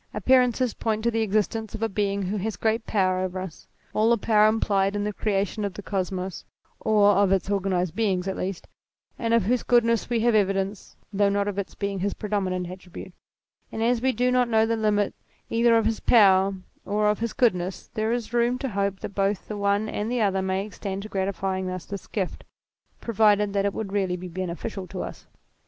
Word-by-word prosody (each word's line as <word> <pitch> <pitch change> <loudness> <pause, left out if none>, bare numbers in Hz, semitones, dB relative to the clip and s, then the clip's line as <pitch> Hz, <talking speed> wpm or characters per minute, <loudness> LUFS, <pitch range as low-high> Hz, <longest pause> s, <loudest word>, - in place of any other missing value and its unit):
Appearances 255 -2 +3
point 220 -1 -2
to 235 - +2
the 225 0 0
existence 215 +1 -1
of 225 - -4
a - - +3
Being 200 -1 -1
who 195 +3 -2
has 205 0 -3
great 225 0 0
power 185 -3 +1
over 185 0 -2
us 185 -4 -8 0.3
all 220 +1 +3
the 235 - +4
power 215 0 +4
implied 200 -2 +1
in 205 - -1
the 210 0 -2
creation 205 +1 -1
of 200 -2 -3
the 205 - -7
Kosmos, 185 -2 -3 0.4
or 210 -2 +4
of 200 -1 +3
its 195 +1 +1
organized 185 -3 0
beings 195 -5 0
at 190 - -2
least 185 -1 -4 0.5
and 230 - -1
of 230 -2 +4
whose 240 +5 +1
goodness 230 -2 +2
we 235 -2 +1
have 240 0 +3
evidence 195 -1 0 0.2
though 200 0 +3
not 200 0 0
of 200 -1 -2
its 200 - -5
being 200 -1 -3
his 200 +2 -1
predominant 190 -4 -2
attribute: 185 0 -10 0.6
and 225 - -2
as 240 0 +2
we 260 +1 +2
do 250 +1 +1
not 250 -1 +2
know 220 -1 +4
the 230 +1 0
limits 210 -2 0 0.3
either 230 0 +4
of 225 - +1
his 225 0 0
power 195 -3 +5 0.3
or 210 +1 0
of 210 0 +1
his 230 0 -2
goodness, 190 -8 0
there 220 +1 -1
is 235 -1 -3
room 240 +1 +2
to 265 +1 -3
hope 200 -2 -2
that - - -6
both 195 0 -1
the 215 - -5
one 200 +1 +1
and 215 +1 -3
the 250 - 0
other 195 -3 +1
may 190 +1 -1
extend 200 -2 -5
to 215 - -8
granting 190 -1 -2
us 185 -1 -5
this 200 -2 -7
gift 190 -4 -3 0.6
provided 210 -2 +3
that 200 0 +1
it 200 - 0
would 200 -3 -4
really 190 -3 0
be 180 +1 -7
beneficial 185 +2 -5
to 185 +1 -5
us. - - -9
205 Hz, 210 wpm, -25 LUFS, 190-225 Hz, 0.6 s, power